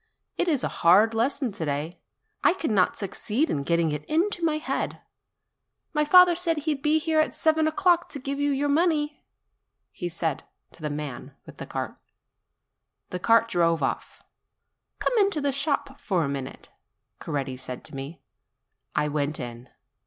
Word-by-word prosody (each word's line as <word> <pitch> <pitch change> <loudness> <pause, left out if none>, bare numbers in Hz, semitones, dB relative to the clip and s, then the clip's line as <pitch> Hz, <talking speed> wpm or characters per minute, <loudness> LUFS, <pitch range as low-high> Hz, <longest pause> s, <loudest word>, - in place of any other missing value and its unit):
It - - 0
is 290 -6 +1
a - - +1
hard 200 +7 +6
lesson 245 +2 0
to 195 -4 -5
day; 150 +3 -3 0.4
I 360 - +5
cannot 215 - +1
succeed 215 - -1
in 140 - -1
getting 170 +2 +1
it 150 0 -3
into 345 +3 0
my 315 -2 +2
head. 310 - -3 0.9
My 300 -1 +2
father 360 +3 +8
said 335 -2 0
that 300 - -4
he 310 -1 +1
would 275 - -8
be 300 +1 +3
here 315 0 +1
at 310 - +1
seven 315 0 +2
o'clock 345 +2 +2
to 285 - -7
give 275 +1 -4
you 290 0 +1
your 285 +1 0
money," 300 -1 +1 0.7
he 175 - -5
said 165 -3 -2 0.3
to - - -19
the 150 - -2
man 145 -3 -6
with - - -13
the - - -7
cart. - - -4 1.1
The 180 - -3
cart 230 +4 +4
drove 170 -6 +2
off. - - -3 0.7
"Come - - 0
into 395 -6 +3
the 285 -1 +1
shop 280 0 -1
a 175 -7 +2
minute," 140 -2 -6 0.5
Coretti 135 -3 -3
said 125 -1 -7
to - - -12
me. 135 +2 -7 0.7
I 150 - +2
went 150 +1 -2
in. 120 0 -7
230 Hz, 170 wpm, -26 LUFS, -, 1.1 s, father